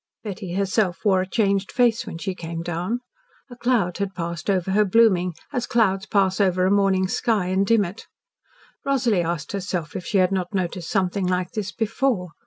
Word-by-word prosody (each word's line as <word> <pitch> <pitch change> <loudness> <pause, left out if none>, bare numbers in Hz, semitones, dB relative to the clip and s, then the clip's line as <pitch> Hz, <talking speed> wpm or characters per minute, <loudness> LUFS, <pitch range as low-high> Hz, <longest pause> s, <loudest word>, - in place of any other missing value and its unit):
Betty 190 -4 -5
herself 195 -1 0
wore 190 -2 +4
a 185 - -3
changed 200 -3 +1
face 240 -3 +2
when - - -6
she 190 +3 -3
came 165 -1 -6
down. 175 +8 -2 0.5
A - - -8
cloud 235 -8 0
had 195 -1 -2
passed 170 +1 -4
over 190 -1 +1
her 210 +2 +4
blooming, 185 -4 +3 0.2
as 245 -3 -1
clouds 195 -3 +1
pass 195 -2 +2
over 185 -2 +2
a 190 - +2
morning 195 -2 +3
sky 215 -1 0
and 190 +1 +1
dim 225 -3 +4
it. 185 +5 -9 0.8
Rosalie 250 - +2
asked 170 -2 -3
herself 185 -5 -3
if 180 - -4
she 200 - 0
had 185 0 +3
not 185 0 -2
noticed 180 -2 -2
something 190 -1 0
like 180 0 -1
this 210 -4 -3
before. 225 -4 -1
195 Hz, 190 wpm, -23 LUFS, 180-215 Hz, 0.8 s, wore